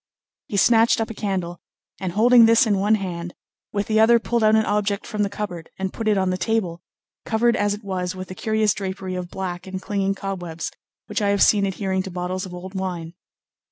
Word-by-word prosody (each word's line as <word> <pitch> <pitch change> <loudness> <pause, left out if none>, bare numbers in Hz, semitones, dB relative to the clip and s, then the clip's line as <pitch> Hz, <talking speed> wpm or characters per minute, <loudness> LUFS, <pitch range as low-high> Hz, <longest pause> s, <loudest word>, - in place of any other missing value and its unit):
He 200 - -3
snatched 230 +2 +5
up 225 0 -2
a - - -5
candle, 185 -5 -3 0.4
and 185 -3 -3
holding 230 +2 +6
this 230 +3 +5
in 205 -3 +1
one 210 +3 +3
hand, 175 -4 -5 0.4
with 205 0 -1
the 215 +1 +1
other 230 +2 +6
pulled 230 0 -1
out 215 0 +5
an 220 0 +3
object 205 -1 0
from 210 - -3
the 200 - +1
cupboard 180 -5 -6
and 190 0 -3
put 225 - -4
it 210 -2 +3
on 190 -1 +1
the 185 - -2
table, 190 -7 -1 0.4
covered 235 +1 +2
as 205 0 +1
it 210 - -13
was 185 -2 -3
with 185 0 -7
the - - -7
curious 215 +1 +1
drapery 190 -1 -5
of 180 -1 -4
black 180 -1 -5
and 190 0 -5
clinging 195 0 -1
cobwebs 175 -4 -5 0.3
which - - -3
I 205 - +2
have 200 0 +4
seen 200 -2 +4
adhering 190 -1 -1
to 190 - -6
bottles 185 +1 -3
of 180 - -10
old 185 +2 -8
wine. 180 -4 -4
195 Hz, 220 wpm, -23 LUFS, 185-215 Hz, 0.4 s, holding